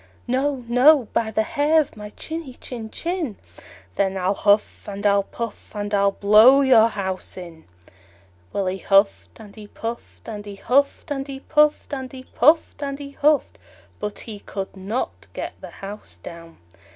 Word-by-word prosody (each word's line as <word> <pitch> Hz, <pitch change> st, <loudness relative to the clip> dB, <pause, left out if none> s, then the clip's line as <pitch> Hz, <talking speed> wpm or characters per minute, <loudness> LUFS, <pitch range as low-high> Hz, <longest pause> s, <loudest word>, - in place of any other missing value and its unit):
"No, 260 Hz, 0 st, -1 dB
no, 250 Hz, +1 st, +5 dB
by 230 Hz, -1 st, +1 dB
the 220 Hz, 0 st, +1 dB
hair 295 Hz, +7 st, +2 dB
of 305 Hz, -, -2 dB
my 210 Hz, -1 st, -8 dB
chinny 315 Hz, +2 st, -7 dB
chin 230 Hz, -4 st, -8 dB
chin." 330 Hz, -, -3 dB, 0.6 s
"Then 195 Hz, -1 st, +1 dB
I'll 185 Hz, +1 st, +1 dB
huff 205 Hz, +1 st, +1 dB
and 200 Hz, +1 st, -6 dB
I'll 200 Hz, 0 st, +4 dB
puff, 230 Hz, +2 st, -7 dB
and 205 Hz, 0 st, -4 dB
I'll 200 Hz, 0 st, +3 dB
blow 215 Hz, +8 st, +7 dB
your 245 Hz, -5 st, +6 dB
house 190 Hz, -5 st, -4 dB
in." 170 Hz, -3 st, -10 dB, 0.9 s
Well, 200 Hz, -, -1 dB
he 185 Hz, +1 st, -2 dB
huffed 195 Hz, +3 st, +2 dB
and 210 Hz, -3 st, -13 dB
he 215 Hz, -2 st, -11 dB
puffed, 230 Hz, +3 st, -7 dB
and 210 Hz, -2 st, -6 dB
he 205 Hz, -1 st, -8 dB
huffed 280 Hz, +8 st, +1 dB
and 275 Hz, -1 st, -3 dB
he 270 Hz, -1 st, -7 dB
puffed, 300 Hz, 0 st, +2 dB
and 265 Hz, -2 st, -4 dB
he 260 Hz, -1 st, -9 dB
puffed 300 Hz, +4 st, +2 dB
and 275 Hz, -1 st, -3 dB
he 280 Hz, -1 st, -8 dB
huffed; 295 Hz, +1 st, +1 dB, 0.4 s
but 210 Hz, 0 st, -4 dB
he 215 Hz, -3 st, -8 dB
could 195 Hz, -1 st, -6 dB
not 200 Hz, +6 st, -4 dB
get -, -, -5 dB
the -, -, -8 dB, 0.2 s
house 205 Hz, +2 st, -8 dB
down. 165 Hz, -1 st, -11 dB
225 Hz, 170 wpm, -23 LUFS, 200-275 Hz, 0.9 s, blow